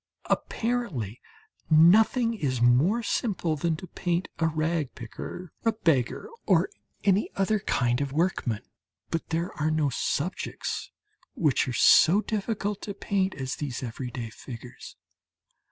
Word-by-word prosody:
Apparently 195 - -1 0.5
nothing 220 +9 +5
is 135 - -1
more 135 - +4
simple 185 -9 0
than 160 +2 0
to 180 +4 -8
paint 175 0 -2
a 165 - +3
rag 155 -2 -1
picker, 160 +9 -8
a 225 - +3
beggar 160 - +1 0.2
or 395 - +3 0.3
any 200 0 +3
other 200 +2 +1
kind 125 -7 +1
of 140 -1 -2
workman; 145 - 0 0.5
but 165 - -2
there 170 +2 -1
are 155 - +2
no 155 -2 +1
subjects - - -2 0.5
which 145 -4 +2
are 125 - -2
so 170 +9 +6
difficult 210 -1 -2
to 200 - -5
paint 195 -2 0
as 130 -1 -4
these 135 -4 -4
everyday 120 -1 -5
figures. 120 +1 -10
160 Hz, 130 wpm, -27 LUFS, 130-200 Hz, 0.5 s, so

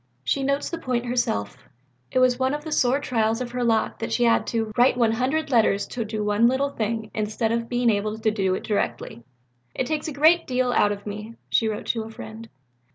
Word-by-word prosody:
She 275 - 0
notes 280 +3 -1
the 335 - -4
point 250 -5 -2
herself: 235 - -1 0.5
it - - -3
was 255 -1 +4
one 260 +2 +1
of 295 - -6
the 315 - -6
sore 260 -2 +2
trials 225 -5 0
of 250 -1 -4
her 250 0 -2
lot 225 -2 +1
that 225 - -4
she 245 - +1
had 230 -1 +3
to 225 -2 -1
"write 245 +1 +4
100 255 +7 +1
letters 210 -4 +3
to 235 - -3
do 215 0 -3
one 210 +3 +3
little 270 +3 +1
thing 220 -2 -3
instead 215 +1 -1
of 230 0 -1
being 245 -1 +2
able 210 +1 -1
to 220 0 +1
do 190 -3 0
it - - -5
directly." 205 - -2 0.5
"It 260 - -1
takes 305 +3 -2
a - - -3
great 315 +4 +4
deal 255 -1 +1
out 205 -2 +3
of 200 0 -6
me," 210 +2 -7 0.2
she 225 - +3
wrote 215 -1 -3
to 230 - 0
a 220 - -7
friend. 225 0 -10
230 Hz, 225 wpm, -24 LUFS, 220-255 Hz, 0.5 s, was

